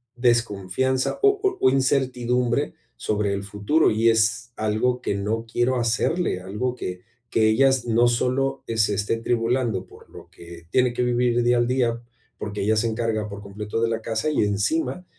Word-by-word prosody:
desconfianza 120 +1 0
o 410 0 +4
o 390 -1 +1
o - - +7
incertidumbre 125 -2 0 0.2
sobre 105 -1 -1
el 100 0 -3
futuro, 105 +11 +1
y 110 +2 +2
es 110 +1 +1
algo 110 +4 0
que - - -2
no 110 +3 -2
quiero 120 +3 0
hacerle, 120 - 0
algo 105 +7 -3
que 90 -6 -6 0.3
que 110 -1 +3
ella 135 +5 +4
s 125 -3 -1
no 115 +2 +4
solo, 130 +3 0
eh, 115 - -3
se 105 -1 +3
esté 105 +3 -1
tribulando 115 -3 -1
por - - -18
lo - - -13
que 85 0 -13
tiene 125 -1 +2
que 125 - -1
vivir 120 0 +1
día 120 0 +3
al 120 0 +2
día, 120 -2 0 0.4
porque 105 -1 -5
ella 110 +2 +2
se 115 +2 +1
encarga 110 -1 -1
por 100 -1 -8
completo 105 +2 -5
de 115 - +2
la 115 0 -2
casa, 110 +6 -2
y 150 - -2
encima, 135 - -1
115 Hz, 180 wpm, -23 LUFS, 105-125 Hz, 0.4 s, o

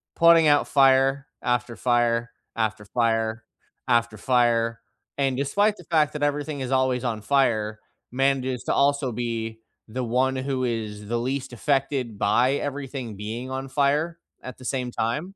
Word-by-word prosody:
putting 165 -1 +6
out 145 -1 +4
fire, 135 0 +4
after 120 -1 -1
fire, 120 0 +1 0.2
after 110 -2 -2
fire, 115 0 0 0.4
after 120 -2 +2
fire, 115 -1 +2 0.4
and 135 -2 +1
despite 205 +10 +2
the - - -12
fact 155 -3 +2
that 150 -1 -3
everything 145 0 -1
is 130 0 -4
always 130 -1 +1
on 110 -3 -2
fire, 110 -4 +1 0.3
manages 130 -1 0
to - - 0
also 140 -2 +2
be 115 -1 -4 0.3
the 125 +3 -3
one 130 +3 +1
who 130 -1 -2
is 105 -3 -3
the 120 +1 -1
least 130 +2 -3
affected 135 -3 -1
by 120 +7 +3
everything 135 -5 -4
being 115 +5 -5
on 135 +1 -4
fire 150 +5 +1 0.2
at 130 -2 -9
the 130 - -14
same 125 -2 -2
time. 150 - -2
130 Hz, 150 wpm, -25 LUFS, 115-140 Hz, 0.4 s, putting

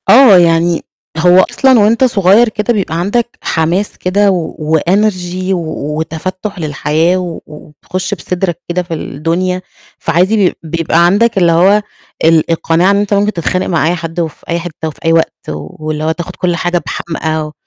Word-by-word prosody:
آه، 240 -6 +8
يعني 170 -1 +2 0.3
هو 180 +3 +5
أصلًا 260 -3 +4
وأنت 225 +4 +3
صغيّر 215 -1 +4
كده 215 +2 -1
بيبقى 185 -6 -2
عندك 235 +6 -1
حماس 170 +5 -1
كده 200 +2 +2
و 170 -4 -2 0.2
وenergy 185 0 0
و 155 -3 -4
وتفتُّح 185 +5 -5
للحياة 155 +3 0
و 175 -3 -4
وتخش 155 +5 -6
بصدرك 175 -2 -3
كده 180 +1 -1
في 170 -1 -7
الدنيا، 170 +5 -2 0.4
فعادي 180 +6 +1
بي 200 -4 +2
بيبقى 165 +1 +1
عندك 205 +5 +2
اللي 175 -3 +4
هو 190 +5 +4 0.4
ال 160 0 +3
القناعة 165 +3 +2
إن 200 - +2
أنت 205 0 0
ممكن 205 +1 +1
تتخانق 185 +2 -1
مع 165 -3 +1
أي 175 - +1
حد 165 0 -4
في 160 -2 -6
أي 170 0 0
حتة 160 -2 -6
في 150 - -13
أي 165 - +3
وقت 165 -1 +2 0.2
واللي 155 - -5
هو 160 - +1
تاخد 175 +2 -6
كل 175 -1 -1
حاجة 175 +1 -1
بحمأه 160 -2 -3
175 Hz, 165 wpm, -13 LUFS, 165-195 Hz, 0.4 s, آه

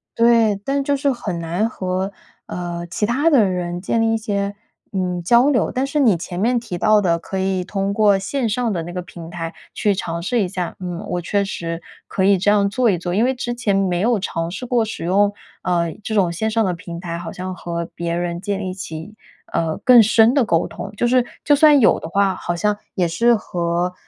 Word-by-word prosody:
对， 230 -3 +4
但 275 +1 0
就 285 +1 +1
是 280 0 +1
很 205 -8 -4
难 175 +7 -1
和， 185 -1 -2 0.4
呃， 175 -1 -4
其 190 +5 -1
他 275 +8 +2
的 260 -9 +5
人 180 -2 -2
建 225 +4 0
立 225 0 +2
一 225 - +2
些， 205 -2 -2 0.4
嗯， 180 -2 -2
交 240 +8 +5
流。 250 - +1
但 260 +2 0
是 290 +2 -1
你 220 -10 +4
前 175 +1 -6
面 240 +4 +2
提 230 -6 -6
到 215 +3 +4
的 170 -3 +1
可 190 +3 -6
以 190 -1 0
通 195 +1 -2
过 205 -2 +4
线 230 +4 -2
上 230 0 0
的 170 - -2
那 175 - -7
个 180 +1 -4
平 170 -1 -10
台 165 -1 -5 0.2
去 205 -1 +2
尝 170 -3 -4
试 240 +3 +1
一 195 - 0
下， 180 -1 -4
嗯， 175 -2 -5
我 175 0 -2
确 200 +4 0
实 165 -3 -4 0.3
可 190 - -1
以 195 -1 +5
这 205 +3 +2
样 205 -1 +4
做 235 +3 +2
一 190 - +2
做。 175 +1 -4
因 215 +5 +2
为 260 - +2
之 240 -1 -3
前 230 -5 0
没 185 -3 +1
有 230 +1 +2
尝 165 -3 -3
试 190 +7 -6
过 240 -2 +2
使 220 -6 -5
用， 200 +3 +3 0.3
呃， 170 -2 0
这 220 - -3
种 185 -5 +3
线 220 +6 -1
上 225 0 +1
的 180 - 0
平 170 0 -8
台， 170 -2 -5
好 170 -1 -6
像 185 +1 -5
和 170 -1 -4
别 170 0 -2
人 175 0 -3
建 200 0 -2
立 185 -2 -4
起， 180 +2 -8 0.4
呃， 160 -1 0
更 250 -2 +9
深 225 +2 +5
的 275 -3 +3
沟 170 -3 +1
通。 200 - -7
就 240 - +2
是， 250 0 +4 0.2
就 290 - +5
算 295 -1 +6
有 225 - +4
的 - - -7
话， 195 +1 +2
好 175 - -3
像 210 +4 +1 0.2
也 180 -3 +2
是 235 +8 +3
和， 175 -2 -2
195 Hz, 245 characters per minute, -20 LUFS, 175-225 Hz, 0.4 s, 更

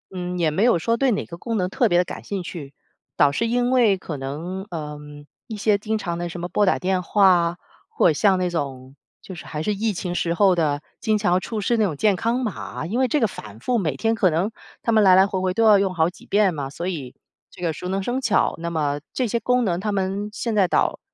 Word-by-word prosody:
嗯， 180 0 -4
也 160 -3 +2
没 185 +8 +1
有 235 -8 +4
说 230 +8 +1
对 265 +2 +2
哪 205 - -1
个 170 - -9
功 230 +5 -3
能 180 -2 0
特 - - +1
别 175 - +3
地 180 - +3
感 - - -8
兴 200 -2 -4
趣， 150 -5 -8 0.4
倒 145 - +5
是 230 +10 0
因 245 +1 +1
为 235 -6 +4
可 170 -4 -6
能， 160 +8 -5
呃， 150 -3 -5 0.5
一 220 - -6
些 210 0 +2
经 215 +2 -2
常 170 -5 -4
地 175 0 -3
什 175 - -7
么 175 - -3
拨 205 +4 +1
打 190 - +2
电 185 0 0
话 200 +2 +4
啊， 175 -2 +3 0.3
或 - - +2
者 - - +2
像 190 +5 +3
那 180 -1 0
种， 135 -5 -5 0.3
就 190 - -9
是 175 - -10
还 155 0 -5
是 210 - 0
疫 215 +2 -1
情 175 -1 -4
时 170 -1 0
候 190 +1 +4
的， 150 -4 0 0.2
经 215 -1 +1
常 205 -4 0
要 180 - +4
出 215 +3 -4
示 235 +4 +1
那 220 - +3
种 170 -6 -2
健 200 +5 +2
康 230 +5 0
码， 215 -8 -5
因 215 +9 -2
为 260 - +3
这 300 +2 0
个 225 - +4
反 110 - -11
复 250 - 0
每 160 - -1
天 225 +11 0
可 205 -4 +3
能 175 +7 0 0.3
他 230 - 0
们 220 -1 +4
来 185 -1 +7
来 190 +1 +6
回 195 -1 -2
回 185 0 0
都 230 - +1
要 210 -2 +6
用 190 -2 0
好 160 0 +2
几 180 - -16
遍 200 -2 +2
嘛， 140 -3 -4
所 170 +5 -6
以， 145 -9 -5 0.3
这 - - -15
个 170 -2 0
熟 170 +3 -7
能 190 +1 -2
生 245 +5 -1
巧， 235 -6 +1
那 170 +1 -4
么 145 -3 -1
这 255 - 0
些 235 +1 -1
功 250 +1 +1
能 175 -5 0
他 210 +2 -2
们 195 +1 -2
现 230 +1 -3
在 200 -3 +3
倒 - - +1
185 Hz, 285 characters per minute, -23 LUFS, 170-215 Hz, 0.5 s, 来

